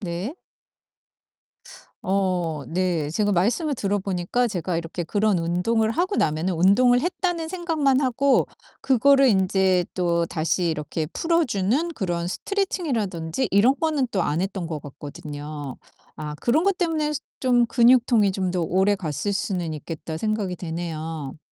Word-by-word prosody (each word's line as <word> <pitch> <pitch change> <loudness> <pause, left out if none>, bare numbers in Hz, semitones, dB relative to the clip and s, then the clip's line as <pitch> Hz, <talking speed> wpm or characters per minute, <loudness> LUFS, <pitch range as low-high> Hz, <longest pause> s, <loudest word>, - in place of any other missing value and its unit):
네. 185 - -4 1.7
어 180 -6 0
네. 170 -4 -1
제가 205 +5 0
말씀을 240 - +1
들어 205 -5 -1
보니까 195 +5 -1
제가 180 -4 -2
이렇게 170 +1 -4
그런 205 +1 +1
운동을 200 +7 +1
하고 365 - 0
나면은 160 +4 0
'운동을 230 +9 +4
했다.'는 350 -1 -1
생각만 320 -6 +1
하고 265 +1 +2 0.3
그거를 275 +1 +4
인제 190 -3 +3
또 170 -2 +1
다시 165 +3 -1
이렇게 155 0 -3
풀어 335 - +1
주는 240 - 0
그런 175 -3 -2
스트레칭이라든지 245 - -2
이런 210 +7 +5
거는 305 -5 +1
또 190 - +1
안 155 +4 0
했던 190 -3 -3
것 155 -2 -4
같거든요. 145 0 -8 0.4
아 150 -1 -5
'그런 290 +7 +2
것 395 -2 +2
때문에 315 -4 0 0.3
좀 245 -2 +3
근육통이 235 -4 +4
좀 185 -1 -1
더 180 -1 -1
오래갔을 190 0 0
수는 190 -7 -2
있겠다.' 160 +1 -6
생각이 210 -1 -1
되네요. 160 -4 -5
195 Hz, 295 characters per minute, -24 LUFS, 170-255 Hz, 1.7 s, 이런